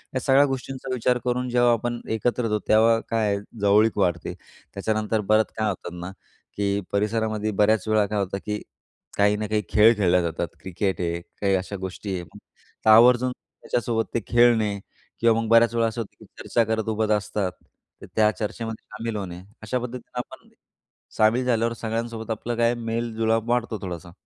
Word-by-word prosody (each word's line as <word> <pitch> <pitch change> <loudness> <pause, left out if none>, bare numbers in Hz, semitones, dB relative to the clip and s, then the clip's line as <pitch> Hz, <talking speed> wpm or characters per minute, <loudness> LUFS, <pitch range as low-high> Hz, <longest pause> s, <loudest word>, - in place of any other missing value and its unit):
या - - +2
सगळ्या 135 +2 +5
गोष्टींचा 135 -1 -4
विचार 125 0 +1
करून 125 0 -1
जेव्हा 120 0 +4
आपण 120 +1 -2 0.2
एकत्र 120 +3 0
होतो, 105 -1 0
तेव्हा 115 +1 +5
काय 115 -2 +1
आहे - - -3 0.2
जवळीक 105 +2 +4
वाढते. 90 -4 0 0.4
त्याच्यानंतर 110 +2 -1
बरंच 110 0 +3
काय 110 -1 +1
होतात 90 -3 -5
ना, 90 +2 -6 0.5
की 100 0 0
परिसरामध्ये 110 +1 0
बऱ्याचवेळा 110 0 +3
काय 105 +1 -2
होतं, 100 0 -2
की 105 0 -3 0.6
काही 105 +1 +4
ना 105 0 -3
काही 105 0 0
खेळ 110 +2 +6
खेळल्या 90 -3 +3
जातात. 85 -2 -2
क्रिकेट 95 0 -2
आहे, 85 0 -2 0.2
काही 100 -1 +3
अशा 95 +2 -3
गोष्टी 95 +1 -5
आहे. 90 - -4
मग 85 - -15 0.5
तर - - +5
आवर्जून 125 +3 +6
त्याच्यासोबत 115 -2 -3
ते - - +1
खेळणे 115 -4 +3 0.4
किंवा 115 -1 +4
मग 115 - -3
बऱ्याचवेळा 115 0 +4
असं 115 +1 -3
होतं, 110 - -9
की - - -14
चर्चा 115 - +1
करत 110 0 -1
उभंच 110 0 0
असतात. 105 -2 0 0.5
तर - - -9
त्या 110 -1 +5
चर्चेमध्ये 110 +2 -5
सामील 115 +1 -4
होणे. 90 -4 -5 0.2
अशा 120 +4 -2
पद्धतीनं 125 0 -8
आपण 120 - -9 0.7
सामील 115 +4 +3
झाल्यावर 115 -1 +1
सगळ्यांसोबत 115 0 -4
आपलं 115 +2 -3
काय 115 0 +3
मेलजुळाव 115 -1 -1
वाढतो 120 -2 0
थोडासा. 85 -2 -6
110 Hz, 170 wpm, -24 LUFS, 105-115 Hz, 0.7 s, खेळ